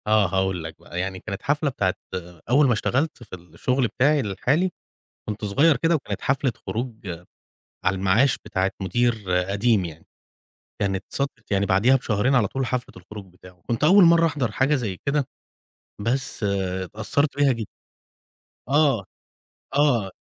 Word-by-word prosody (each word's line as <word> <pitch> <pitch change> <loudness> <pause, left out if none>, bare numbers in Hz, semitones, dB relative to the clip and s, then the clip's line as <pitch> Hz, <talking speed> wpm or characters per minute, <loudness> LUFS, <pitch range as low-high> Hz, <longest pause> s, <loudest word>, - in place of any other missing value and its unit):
آه 105 -2 +4
هاقول 95 -1 -1
لك 80 -1 -7
بقى، 85 - -7
يعني 95 0 -3
كانت 100 -1 -6
حفلة 145 +1 +1
بتاعة 95 -8 0 0.6
أول 140 +3 +5
ما 120 - +3
اشتغَلت 135 +8 -1
في - - -9
الشغل 120 - -1
بتاعي 145 +6 +2
الحالي، 140 - 0 0.6
كنت 105 0 -4
صغير 140 +10 +4
كده 165 +1 +2
وكانت 150 - -4
حفلة 135 -1 +1 0.2
خروج 120 +1 -3 0.9
على 100 - +2
المعاش 100 +7 +3
بتاعة 95 -2 0
مدير 110 +3 0 0.2
قديم 100 -1 +2
يعني. 80 -1 -9 0.8
كانت 95 -1 0
صادفت 140 -6 -4
يعني 100 0 +2
بعديها 100 +8 +4
بشهرين 125 +1 +1
على 110 -5 +3
طول، 135 +4 -2
حفلة 125 0 -3
الخروج 100 +2 -10
بتاعه، 90 -1 -17
كنت 115 +3 -1
أول 190 +6 +7
مرَّة 165 -1 +6
أحضَر 145 -8 -1
حاجة 135 +7 +2
زي 110 -9 -3
كده، 140 -1 +1 0.7
بس 130 +5 -2
اتأثَّرت 100 - -1
بيها 140 -1 +4
جدًا. 115 -3 -4 1.0
آه، 140 -8 +3 0.7
آه. 130 -9 +2
115 Hz, 150 wpm, -24 LUFS, 95-140 Hz, 1.0 s, أول